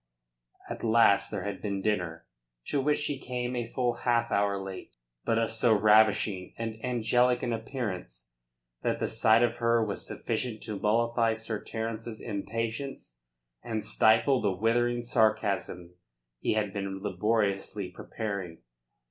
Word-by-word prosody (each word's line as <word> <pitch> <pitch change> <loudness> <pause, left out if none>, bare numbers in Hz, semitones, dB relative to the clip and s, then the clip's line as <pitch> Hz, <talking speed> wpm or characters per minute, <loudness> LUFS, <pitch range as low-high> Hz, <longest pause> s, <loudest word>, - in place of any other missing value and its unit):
At - - -6
last 115 -3 +4
there 100 -3 -4
had 100 -1 -4
been 100 -2 -2
dinner 90 -6 -1 0.4
to 140 - +1
which 150 +2 +2
she 145 -2 -2
came 125 -1 -3
a 120 -2 -2
full 120 0 -1
half 120 -1 +1
hour 100 0 +2
late, 95 -1 -8 0.3
but 115 - +2
of 115 -1 +1
so 115 -1 +3
ravishing 105 -2 +3
and 115 -1 -5
angelic 125 +1 +2
an 120 -2 0
appearance 95 - -5 0.5
that - - 0
the - - -1
sight 110 +1 +4
of 120 0 +1
her 115 -1 +2
was 100 - -4
sufficient 115 -4 -3
to 105 -3 -5
mollify 115 +1 +2
Sir 110 -1 -5
Terence's 115 0 -4
impatience 115 - -4 0.4
and 110 -2 -3
stifle 110 +5 +4
the - - +2
withering 120 +5 +1
sarcasms 110 -6 0 0.5
he - - 0
had 105 -2 -1
been 95 -1 -4
laboriously 100 -1 0
preparing. 95 -3 -5
110 Hz, 140 wpm, -29 LUFS, 100-120 Hz, 0.5 s, last